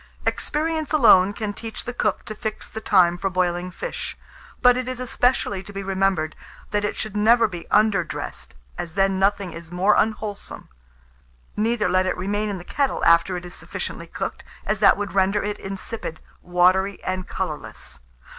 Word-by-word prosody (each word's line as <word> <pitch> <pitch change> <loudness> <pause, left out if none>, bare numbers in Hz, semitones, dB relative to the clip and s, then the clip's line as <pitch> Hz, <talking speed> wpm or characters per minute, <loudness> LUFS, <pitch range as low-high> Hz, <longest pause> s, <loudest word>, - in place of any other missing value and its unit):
Experience 315 0 -1
alone 200 -9 +6
can 205 0 -4
teach 225 +1 -7
the 245 - -4
cook 215 -4 -1
to 215 - -5
fix 215 0 -5
the 220 - -7
time 175 -5 +4
for 195 - 0
boiling 180 -1 0
fish; - - -5 0.4
but 250 0 +6
it 255 0 -2
is 255 -1 -4
especially 245 -5 +1
to 195 - -11
be 195 0 -5
remembered, 190 -5 0 0.4
that 205 -1 0
it 210 - -1
should 215 -1 -5
never 225 +2 +5
be 175 -4 -8
underdressed, 200 - 0 0.2
as 165 -1 -5
then 195 -1 +2
nothing 195 -1 +1
is 170 0 -10
more 190 +4 +3
unwholesome. 215 -1 -2 0.9
Neither 220 0 +1
let 185 0 +2
it - - -1
remain 205 +3 -1
in 200 - -3
the 175 - -9
kettle 275 +8 -1
after 170 +2 +4
it 175 - -7
is 175 - -9
sufficiently - - -6
cooked, - - -5 0.2
as 215 - 0
that 205 - +6
would 205 0 -4
render 195 +1 +2
it 210 0 -3
insipid, 195 -3 -5 0.2
watery, 185 +3 +2
and 185 0 -3
colourless. - - -5
200 Hz, 175 wpm, -23 LUFS, 185-220 Hz, 0.9 s, alone